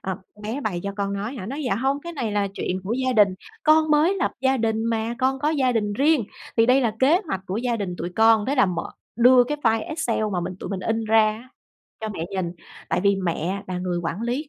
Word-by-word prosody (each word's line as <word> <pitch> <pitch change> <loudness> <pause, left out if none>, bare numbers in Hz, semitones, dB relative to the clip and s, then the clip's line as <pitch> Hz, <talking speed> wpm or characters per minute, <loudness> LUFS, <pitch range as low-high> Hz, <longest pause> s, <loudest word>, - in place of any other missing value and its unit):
Ờm, 190 -1 -4 0.2
"Con 210 - -16
bé 230 +7 -3
bày 195 -8 -2
cho 200 - -2
con 200 0 -2
nói 210 +6 -4
hả?" 190 -5 -6
Nói: 280 +5 -4
"Dạ 240 - +1
hông. 270 +5 0
Cái 340 +3 -7
này 235 -9 -3
là 200 -1 0
chuyện 185 +1 -2
của 210 - -2
gia 260 +1 0
đình, 205 -4 +4 0.3
con 310 0 +4
mới 310 +6 +4
lập - - 0
gia 265 0 +2
đình 225 -1 0
mà, 230 0 -1
con 265 +1 +1
có 295 +3 +1
gia 265 -5 +2
đình 210 -3 0
riêng 280 +1 +2 0.3
thì 225 - +5
đây 255 +2 +5
là 230 -4 0
kế 310 +8 +5
hoạch 190 -9 -2
của 190 - -3
gia 240 0 -1
đình 195 -4 -3
tụi 175 +2 -4
con." 225 -1 +5
Thế 280 - +1
là 260 -5 +4
mở, 180 -2 -3 0.3
đưa 245 +1 +6
cái 295 +4 -3
file 225 -3 +1
Excel 315 -8 -1
mà 175 - 0
mình 180 - -4
tụi - - -5
mình 190 - -3
in 225 +2 -1
ra 220 0 +5
á 235 +4 -11 0.5
cho 220 - -3
mẹ 170 -5 -4
nhìn. 185 -3 -2 0.4
Tại - - 0
vì 200 0 +4
mẹ 185 +1 -2
là 180 - -3
người 180 -1 -2
quản 170 +5 -3
lý 255 +5 -2
225 Hz, 260 wpm, -23 LUFS, 200-265 Hz, 0.5 s, đưa